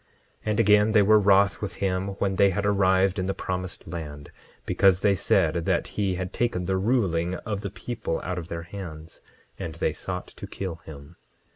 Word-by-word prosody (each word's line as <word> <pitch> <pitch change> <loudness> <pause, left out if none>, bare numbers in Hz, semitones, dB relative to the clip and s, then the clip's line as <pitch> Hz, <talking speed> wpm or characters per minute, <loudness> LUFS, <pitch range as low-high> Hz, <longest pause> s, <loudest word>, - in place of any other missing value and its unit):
10:15 - - -39 0.4
And 110 +1 0
again, 105 0 +5
they 105 - +6
were 110 +2 +6
wroth 100 0 +4
with 95 -4 -4
him 95 0 -1
when 95 -1 -1
they 100 - +5
had 100 +2 -2
arrived 95 -1 +3
in 95 - -1
the 95 - -1
promised 90 -1 -5
land, 75 -3 -7 0.3
because 95 -1 +3
they 100 - +4
said 95 -4 +2
that - - +1
he 100 -3 0
had 90 0 -4
taken 115 -7 -1
the 95 +1 0
ruling 95 -5 +1
of 100 +2 -4
the 100 - -4
people 105 -2 -4
out 90 +1 -3
of 85 - -8
their 85 -1 -5
hands; 85 -3 -9 0.4
and - - -5
they - - 0
sought - - -5
to - - -10
kill 95 -4 -5
him. 70 -2 -11
95 Hz, 195 wpm, -26 LUFS, 90-100 Hz, 0.4 s, they